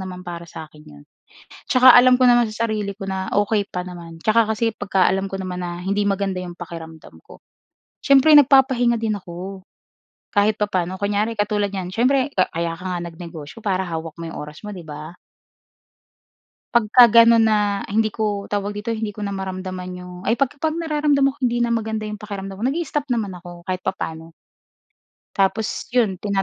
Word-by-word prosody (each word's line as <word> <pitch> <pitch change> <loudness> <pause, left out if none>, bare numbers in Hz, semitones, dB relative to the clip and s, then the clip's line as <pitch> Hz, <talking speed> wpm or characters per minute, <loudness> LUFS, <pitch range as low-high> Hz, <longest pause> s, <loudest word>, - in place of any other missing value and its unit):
naman 180 -1 -7
para 170 -1 -7
sa 160 - -8
akin 150 - -17
'yon. 75 0 -14 0.6
Tsaka 255 0 +7
alam 255 0 +6
ko 250 - +6
naman 240 -1 +4
sa 230 +1 -1
sarili 205 -2 -3
ko 195 -1 -6
na 190 0 -3
okey 205 0 +1
pa 180 - -4
naman. 170 -2 -10
Tsaka 220 0 +3
kasi 220 +1 0
'pagka 190 -2 +2
alam 195 +1 -1
ko 195 - -7
naman 180 -1 -5
na 175 0 -5
hindi 200 +2 0
maganda 195 -1 -1
yung 180 -1 -6
pakiramdam 160 - -10
ko, - - -15 0.6
siyempre 280 +3 +6
nagpapahinga 260 -4 +5
din 220 -2 -1
ako, 185 +1 -8 0.7
kahit 205 0 +2
papaano. 185 -3 -1
Kunyari 205 +3 0
katulad 205 -1 0
niyan, 185 -2 -5
siyempre 265 +5 +2
ka 185 - +3
kaya 170 0 -2
ka - - -11
nga - - -3
nag-negosyo 165 +2 -10
para 190 -2 0
hawak 165 -1 -5
mo - - -5
yung - - -7
oras 150 +4 -9
mo, 210 - -6
'di 180 -4 -8
ba? 150 +2 -8 1.6
Pagka 235 +1 +6
gano'n 230 0 +6
na 205 -2 +1
hindi 215 +1 +1
ko, 205 -2 -2
tawag 205 0 -3
dito 215 +2 -3
hindi 220 -1 -3
ko 210 0 -6
na 200 - -3
maramdaman 185 -1 -5
'yong 180 0 -10
ay, 230 - +3
'pag 275 -2 +1
pag 315 0 -1
nararamdaman 295 -4 +1
ko 285 - -24
hindi 240 -1 +1
na 235 - 0
maganda 220 -1 -2
'yong 210 0 -6
pakiramdam 195 -1 -7
ko - - -7
nag-i-stop 295 -2 -2
naman 220 -6 -1
ako 175 -1 -12
kahit 185 0 -3
papaano. 165 -3 -5 1.0
Tapos, 200 +3 0
'yun 220 -7 +2
tina 200 -2 0
200 Hz, 185 wpm, -21 LUFS, 180-230 Hz, 1.6 s, Tsaka